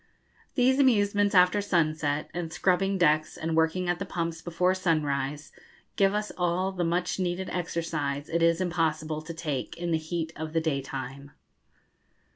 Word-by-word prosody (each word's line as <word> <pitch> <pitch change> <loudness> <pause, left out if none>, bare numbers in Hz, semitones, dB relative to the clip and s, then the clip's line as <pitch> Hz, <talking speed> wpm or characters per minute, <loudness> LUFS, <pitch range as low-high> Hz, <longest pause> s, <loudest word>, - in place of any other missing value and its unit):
These 260 +1 +3
amusements 205 -6 +3
after 180 +3 +5
sunset, 155 -6 0
and 170 -2 -4
scrubbing 195 +3 +1
decks 155 -3 +2
and 160 0 -2
working 165 +3 +1
at 175 0 0
the - - -2
pumps 165 -2 -3
before 180 +2 +1
sunrise, 150 -5 -1 0.4
give 195 0 +3
us 210 0 -2
all 180 +2 +1
the 180 -2 -2
much 175 +2 0
needed 185 0 -2
exercise 165 -5 -2
it 170 +1 -1
is 165 0 +4
impossible 160 -3 -1
to 165 +2 -7
take 150 -6 -4
in 175 0 -3
the 160 - +2
heat 160 0 -4
of 155 0 -6
the 165 - +3
daytime. 140 -2 -4
170 Hz, 155 wpm, -28 LUFS, 155-185 Hz, 0.4 s, after